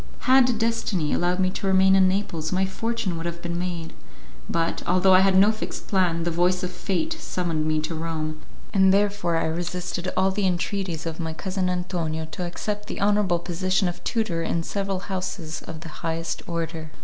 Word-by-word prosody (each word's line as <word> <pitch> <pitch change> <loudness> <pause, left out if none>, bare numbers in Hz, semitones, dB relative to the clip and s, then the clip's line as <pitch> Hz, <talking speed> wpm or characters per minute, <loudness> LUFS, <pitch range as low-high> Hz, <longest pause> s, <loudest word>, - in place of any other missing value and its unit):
Had 255 -2 +5
destiny 225 -8 0
allowed 180 +1 +1
me 185 -1 +2
to 195 - -3
remain 190 0 +5
in 190 -1 +6
Naples 185 -5 -1
my 190 +1 +2
fortune 220 -2 -2
would 165 +1 -3
have 170 0 -5
been 170 0 -3
made; 175 -2 -4 0.6
but, 165 0 0
although 185 +2 +5
I 185 - +8
had 190 0 +4
no 200 +3 +7
fixed 215 - -6
plan, 175 -4 +2
the 170 - 0
voice 180 +2 +2
of 180 - -2
fate 200 - -1
summoned 165 -4 -1
me 155 0 +2
to 155 +2 -3
Rome, 155 -1 -3 0.3
and 190 -1 +5
therefore 200 -3 +2
I - - +1
resisted 175 +2 -2
all 190 +1 +3
the 195 0 +1
entreaties 180 -2 -2
of 165 -1 -4
my 160 -1 -3
cousin 185 +2 -2
Antonio 175 -3 -2
to 180 +1 -3
accept 205 +4 -4
the - - -5
honourable 200 -3 +3
position 185 +3 0
of 175 - -5
tutor 215 -8 0
in 165 0 -1
several 195 0 -2
houses 180 -5 -4
of 160 -1 -8
the 165 - -8
highest 165 0 -2
order. 165 -1 -3
180 Hz, 190 wpm, -25 LUFS, 165-195 Hz, 0.6 s, I